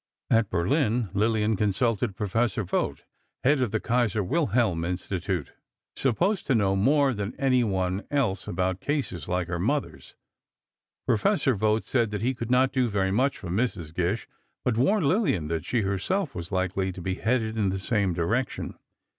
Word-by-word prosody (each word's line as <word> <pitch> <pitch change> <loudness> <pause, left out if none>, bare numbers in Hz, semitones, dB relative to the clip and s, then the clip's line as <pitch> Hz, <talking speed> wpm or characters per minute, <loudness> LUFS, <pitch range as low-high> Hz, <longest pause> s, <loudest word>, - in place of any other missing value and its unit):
At 115 -2 +3
Berlin 115 - +1
Lillian 110 +1 +2
consulted 105 +1 0
Professor 110 +2 0
Vogt, 95 - -2 0.4
head 135 +1 +3
of 125 - +1
the 110 - -1
Kaiser 115 -3 +1
Wilhelm 115 - +1
Institute, 90 -2 -3 0.4
supposed 175 - 0
to 135 - +3
know 100 -3 +2
more 140 +7 +3
than 105 -1 -4
anyone 105 -8 +1
else 130 -9 0
about 90 +1 -1
cases 135 - -2
like 90 -1 -1
her 90 -1 -3
mother's. 140 +10 -2 0.9
Professor 135 - +2
Vogt 110 +1 +1
said 115 -4 0
he 115 +6 0
could 120 -2 -5
not 130 +1 +3
do 130 -3 +2
very 95 -2 0
much 130 +7 +1
for 95 - -8
Mrs. 90 -6 -2
Gish, 90 +6 -1 0.4
but 125 - +2
warned 160 - +2
Lillian 140 - +1
that 80 -2 -2
she 120 - 0
herself 105 - -1
was 85 0 -6
likely 95 0 0
to 90 - -9
be 95 +2 -2
headed 110 +2 0
in 105 -3 +1
the 95 - -1
same 100 -1 0
direction. 115 +10 -2
110 Hz, 160 wpm, -26 LUFS, 95-125 Hz, 0.9 s, At